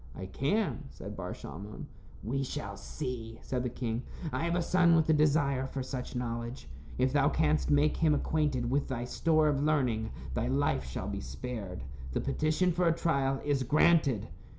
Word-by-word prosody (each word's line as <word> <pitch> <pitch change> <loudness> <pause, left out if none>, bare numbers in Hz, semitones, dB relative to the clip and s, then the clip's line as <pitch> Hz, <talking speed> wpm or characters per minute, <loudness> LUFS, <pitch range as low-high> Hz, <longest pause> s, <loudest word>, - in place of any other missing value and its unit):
"I 95 - -6
can," 140 - -1
said 100 +2 -8
Bar 90 - -5
Shalmon. 100 +9 -8 0.4
"We 135 +6 -1
shall 135 - -4
see," 115 - -5
said 125 -2 -2
the 125 - -1
king. 115 -1 -3 0.3
"I 135 +6 0
have 170 0 +1
a 180 - +2
son 175 -1 +4
with 160 -1 +3
a - - +6
desire 145 -3 +3
for 135 0 -4
such 130 -1 -5
knowledge. 120 +1 -4 0.3
If 130 +1 +2
thou 145 0 +4
canst 155 0 +1
make 145 +1 +3
him 155 -2 +4
acquainted 140 -6 0
with 140 +1 +1
thy 120 -2 -3
store 155 +4 +2
of 145 -2 +2
learning, 125 -8 +1 0.2
thy 120 - 0
life 130 - +1
shall 60 - -4
be - - -3
spared. 90 - -6 0.3
The - - +1
petition 155 +6 +1
for 175 +1 +2
a 165 - +3
trial 135 -5 +1
is 145 -2 +1
granted." 145 - +3
135 Hz, 180 wpm, -31 LUFS, 120-155 Hz, 0.4 s, a